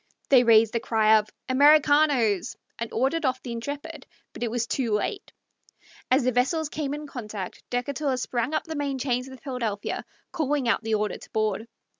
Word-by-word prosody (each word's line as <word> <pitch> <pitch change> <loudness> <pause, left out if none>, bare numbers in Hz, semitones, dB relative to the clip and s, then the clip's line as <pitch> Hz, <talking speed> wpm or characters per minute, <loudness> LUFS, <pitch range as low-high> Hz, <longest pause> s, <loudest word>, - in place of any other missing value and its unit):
They 260 -3 +7
raised 225 -2 +5
the 230 - +1
cry 220 -1 +4
of 210 0 -7 0.2
"Americanos!" 285 - +4 0.2
and 230 0 -4
ordered 270 +7 0
off 255 -2 0
the 245 - -6
Intrepid, 280 +5 -6 0.3
but - - -10
it 240 - 0
was 235 0 -1
too 235 -2 -1
late. 375 - -2 0.8
As 260 +1 +4
the 255 - +2
vessels 285 +6 +1
came 290 -2 -3
in 300 0 -7
contact, 210 -9 -7
Decatur 265 +2 -1
sprang 245 +3 -2
up - - 0
the 320 - -6
main 285 -2 -2
chains 250 -1 -1
of 265 - -9
the 250 - -19
Philadelphia, 235 -7 -3 0.3
calling 290 -5 0
out 230 - +2
the 220 0 0
order 210 0 -2
to - - -14
board. 215 0 -1
250 Hz, 185 wpm, -26 LUFS, 225-285 Hz, 0.8 s, They